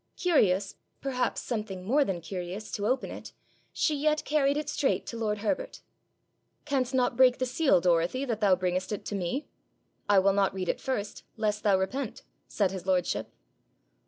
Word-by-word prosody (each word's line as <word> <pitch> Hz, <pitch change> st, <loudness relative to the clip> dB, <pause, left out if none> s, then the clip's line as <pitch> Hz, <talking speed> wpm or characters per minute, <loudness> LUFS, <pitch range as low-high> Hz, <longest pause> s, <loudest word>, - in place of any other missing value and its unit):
Curious, 205 Hz, -, +2 dB, 0.2 s
perhaps 265 Hz, -2 st, -1 dB
something 210 Hz, -6 st, -4 dB
more 280 Hz, +8 st, +4 dB
than 190 Hz, -8 st, -3 dB
curious, 180 Hz, +4 st, -6 dB
to 205 Hz, 0 st, -2 dB
open 255 Hz, +2 st, 0 dB
it, -, -, -9 dB, 0.4 s
she 310 Hz, -, +1 dB
yet 305 Hz, +1 st, +1 dB
carried 285 Hz, -1 st, +2 dB
it 300 Hz, -1 st, -3 dB
straight 285 Hz, -2 st, 0 dB
to -, -, -6 dB
lord 215 Hz, -2 st, -1 dB
Herbert. -, -, -2 dB, 0.8 s
'Canst 265 Hz, -3 st, 0 dB
not 250 Hz, -1 st, +2 dB
break 255 Hz, 0 st, +5 dB
the 255 Hz, -, 0 dB
seal, 260 Hz, -, +3 dB
Dorothy, 175 Hz, +9 st, +1 dB
that 230 Hz, -4 st, -3 dB
thou 195 Hz, -3 st, +5 dB
bringest 185 Hz, +1 st, -1 dB
it 210 Hz, -, -4 dB
to -, -, -4 dB
me? 195 Hz, -, -2 dB, 0.6 s
I 205 Hz, -, +5 dB
will 195 Hz, +1 st, +5 dB
not 195 Hz, -1 st, +1 dB
read 185 Hz, -2 st, -3 dB
it -, -, -1 dB
first, 215 Hz, -6 st, -3 dB, 0.2 s
lest 215 Hz, -1 st, 0 dB
thou 200 Hz, -3 st, +4 dB
repent,' 235 Hz, +6 st, -3 dB, 0.2 s
said 195 Hz, -3 st, 0 dB
his 190 Hz, -1 st, -7 dB
lordship. 185 Hz, -1 st, 0 dB
215 Hz, 175 wpm, -28 LUFS, 190-265 Hz, 0.8 s, break